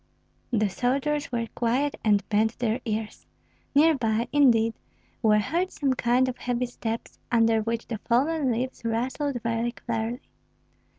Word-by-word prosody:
The 215 Hz, -4 st, +2 dB
soldiers 275 Hz, +8 st, -1 dB
were 235 Hz, -1 st, -1 dB
quiet 255 Hz, +5 st, +1 dB
and 205 Hz, -2 st, +2 dB
bent 220 Hz, +1 st, +1 dB
their 235 Hz, +1 st, -1 dB
ears. 215 Hz, -1 st, -4 dB, 0.5 s
Near 320 Hz, +3 st, +6 dB
by, 230 Hz, -2 st, 0 dB
indeed, 230 Hz, -6 st, +4 dB, 0.5 s
were 215 Hz, -3 st, +4 dB
heard 340 Hz, -, 0 dB
some 275 Hz, -7 st, 0 dB
kind 250 Hz, +1 st, +2 dB
of 255 Hz, -, -4 dB
heavy 250 Hz, 0 st, -1 dB
steps, 230 Hz, -1 st, -5 dB
under 225 Hz, -2 st, +4 dB
which 230 Hz, +1 st, -2 dB
the 225 Hz, -3 st, -5 dB
fallen 275 Hz, +5 st, +1 dB
leaves 250 Hz, +2 st, -3 dB
rustled 250 Hz, +4 st, -1 dB
very 230 Hz, +1 st, -1 dB
clearly. 235 Hz, +1 st, -3 dB
235 Hz, 140 wpm, -26 LUFS, 225-260 Hz, 0.5 s, Near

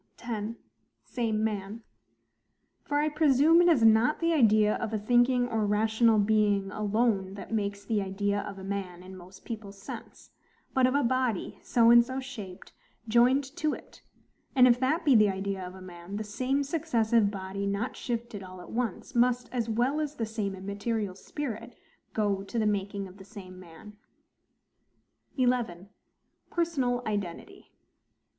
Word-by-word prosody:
10. 225 Hz, -2 st, -4 dB, 0.5 s
Same 220 Hz, -3 st, -2 dB
man. 210 Hz, +1 st, -3 dB, 1.0 s
For 290 Hz, -, -2 dB
I 300 Hz, +1 st, +2 dB
presume 305 Hz, +2 st, +4 dB
it 350 Hz, -, +4 dB
is 305 Hz, -9 st, +4 dB
not 225 Hz, +6 st, +5 dB
the 335 Hz, 0 st, +1 dB
idea 215 Hz, -6 st, +4 dB
of 230 Hz, -2 st, -4 dB
a 220 Hz, -, 0 dB
thinking 245 Hz, +3 st, +3 dB
or 225 Hz, -3 st, -1 dB
rational 220 Hz, +2 st, +3 dB
being 205 Hz, -2 st, +2 dB
alone 210 Hz, -2 st, 0 dB
that 205 Hz, -, -8 dB
makes 200 Hz, -2 st, -2 dB
the 210 Hz, -1 st, 0 dB
IDEA 200 Hz, +1 st, -1 dB
OF 200 Hz, -, -8 dB
A 190 Hz, -, -9 dB
MAN 190 Hz, -3 st, -5 dB
in 190 Hz, +1 st, -11 dB
most 185 Hz, +1 st, -14 dB
people's 210 Hz, -4 st, -7 dB
sense: 195 Hz, -, -10 dB, 0.4 s
but 260 Hz, -1 st, +4 dB
of 255 Hz, -, 0 dB
a 285 Hz, -, +3 dB
body, 250 Hz, -4 st, -1 dB
so 230 Hz, -1 st, +4 dB
and 235 Hz, 0 st, +8 dB
so 260 Hz, +2 st, -5 dB
shaped, 220 Hz, -9 st, -9 dB, 0.3 s
joined 245 Hz, +5 st, +4 dB
to 305 Hz, -1 st, 0 dB
it; -, -, -15 dB, 0.5 s
and 255 Hz, -1 st, +7 dB
if 245 Hz, 0 st, +4 dB
that 310 Hz, +7 st, 0 dB
be 285 Hz, -, +5 dB
the 215 Hz, -2 st, +6 dB
idea 195 Hz, 0 st, -3 dB
of 180 Hz, +1 st, -8 dB
a 190 Hz, -, -12 dB
man, 175 Hz, +1 st, -9 dB
the 215 Hz, -, -3 dB
same 255 Hz, +6 st, -1 dB
successive 235 Hz, -8 st, +1 dB
body 195 Hz, 0 st, -4 dB
not 200 Hz, +5 st, -2 dB
shifted 235 Hz, -3 st, -4 dB
all 185 Hz, -1 st, -10 dB
at 180 Hz, -, -11 dB
once, 235 Hz, +1 st, -3 dB
must, 245 Hz, 0 st, +2 dB
as 235 Hz, -3 st, -2 dB
well 245 Hz, +7 st, +1 dB
as 300 Hz, -1 st, -3 dB
the 230 Hz, -, -2 dB
same 215 Hz, -3 st, -3 dB
immaterial 200 Hz, +1 st, -3 dB
spirit, 230 Hz, +2 st, -6 dB, 0.4 s
go 205 Hz, -3 st, +1 dB
to 200 Hz, +4 st, -6 dB
the 220 Hz, -, +2 dB
making 200 Hz, -1 st, -1 dB
of 185 Hz, +1 st, -15 dB
the 190 Hz, -, -12 dB
same 190 Hz, -3 st, -11 dB
man. 185 Hz, +4 st, -13 dB, 1.4 s
11. 240 Hz, -8 st, 0 dB, 0.6 s
Personal 270 Hz, -8 st, 0 dB
Identity. 205 Hz, -5 st, -5 dB
220 Hz, 165 wpm, -28 LUFS, 200-245 Hz, 1.4 s, and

